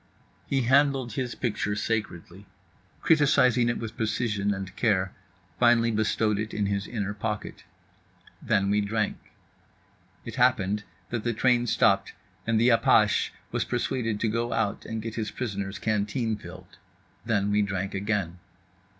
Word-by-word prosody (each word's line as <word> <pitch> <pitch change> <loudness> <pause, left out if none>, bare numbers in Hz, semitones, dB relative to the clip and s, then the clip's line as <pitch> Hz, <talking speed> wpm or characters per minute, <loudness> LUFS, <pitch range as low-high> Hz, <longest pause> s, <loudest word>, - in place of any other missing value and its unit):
He 135 -1 +1
handled 135 -2 +3
his 125 0 -3
picture 105 -3 -2
sacredly, 105 -3 -4 0.6
criticised 145 -6 +4
it 120 0 +2
with 110 -2 -6
precision 110 -3 -1
and 95 -1 -5
care, 95 -5 +1 0.5
finally 120 -1 +4
bestowed 110 -1 +1
it 110 0 -4
in 105 - 0
his 100 0 -1
inner 100 -4 -3
pocket. 105 +1 -5 0.8
Then 100 0 +1
we 105 0 +3
drank. 105 +1 -1 1.1
It - - -7
happened 105 -5 +2 0.3
that 115 -2 -2
the 120 - 0
train 120 0 +2
stopped 110 -4 +2 0.3
and 115 -1 +2
the 120 +2 +4
apache 115 -2 +4 0.2
was - - 0
persuaded 120 -3 -2
to 115 - +2
go 115 +2 -1
out 115 -3 -1
and 110 -1 -4
get 115 -1 -5
his 110 -2 -3
prisoner's 100 -5 -4
canteen 110 +2 -1
filled. - - -12 0.4
Then 105 -3 0
we 105 0 +3
drank 95 -1 -2
again. 95 -3 -2
110 Hz, 140 wpm, -27 LUFS, 100-120 Hz, 1.1 s, criticised